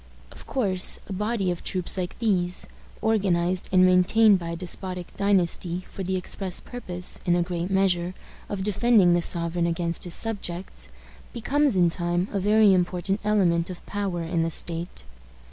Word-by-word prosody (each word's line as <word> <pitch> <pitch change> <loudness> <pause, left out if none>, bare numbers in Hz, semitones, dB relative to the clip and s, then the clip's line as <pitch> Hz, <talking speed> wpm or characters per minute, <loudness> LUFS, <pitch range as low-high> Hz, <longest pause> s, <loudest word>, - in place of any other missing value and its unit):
Of - - -14
course, 190 -8 +1
a 195 - -5
body 210 -1 -1
of 175 - -6
troops 180 -2 -1
like 180 -2 -4
these, 180 -6 +1 0.4
organized 185 -4 +1
and 185 -1 +5
maintained 185 +3 +5
by 170 -1 -6
a 170 - -3
despotic 180 +1 -5
dynasty 185 -2 0
for - - -8
the 190 0 -2
express 185 0 -2
purpose, 180 -8 -5
in 175 - +2
a 175 - +2
great 175 0 -3
measure, 185 -2 +1 0.3
of 195 -2 -3
defending 210 -2 +4
the 175 - +2
sovereign 170 0 +1
against 170 0 -1
his 175 - +1
subjects, 195 -5 -2 0.4
becomes 275 0 +1
in 175 -2 +4
time 175 +2 -1
a 200 - -1
very 210 +1 +5
important 180 +2 0
element 185 -5 +2
of 180 - -9
power 195 -4 -3
in 165 0 -1
the 165 - 0
state. 170 +1 -5
185 Hz, 160 wpm, -25 LUFS, 175-200 Hz, 0.4 s, and